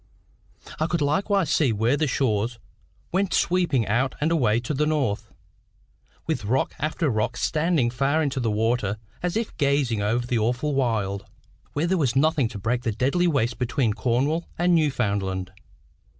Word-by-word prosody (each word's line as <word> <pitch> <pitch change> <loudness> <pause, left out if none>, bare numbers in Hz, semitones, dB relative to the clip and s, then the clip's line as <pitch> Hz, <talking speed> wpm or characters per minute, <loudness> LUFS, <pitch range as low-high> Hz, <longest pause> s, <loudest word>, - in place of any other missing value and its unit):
I 155 - +1
could 170 -2 -1
likewise 185 +3 +1
see 145 -7 +3
where 115 +5 +1
the 150 +1 0
shore 115 -5 +1 0.6
went 190 +1 +1
sweeping 170 -10 +2
out 125 +6 0
and 155 +3 +1
away 120 -9 +2
to 120 +5 -3
the 150 +2 +1
north, 115 -9 -1 0.9
with - - -2
rock 130 +6 0
after 155 +3 -1
rock 115 -1 0
standing 155 -6 +1
far 140 +5 +1
into 140 -2 -1
the 120 -3 0
water, 110 -1 0 0.2
as 180 +3 -1
if 225 -1 -3
gazing 140 -6 +1
over 115 +4 0
the 120 -1 0
awful 125 +7 0
wild, 110 -7 -1 0.5
where 150 +3 0
there 185 +1 +1
was 135 -5 +1
nothing 150 -2 +3
to 110 - -8
break 115 +4 -1
the 115 - -1
deathly 135 - +1
waste 125 -7 0
between 125 -2 0
Cornwall 135 +9 0
and 175 +1 +3
Newfoundland. 100 - 0
130 Hz, 165 wpm, -24 LUFS, 115-155 Hz, 0.9 s, see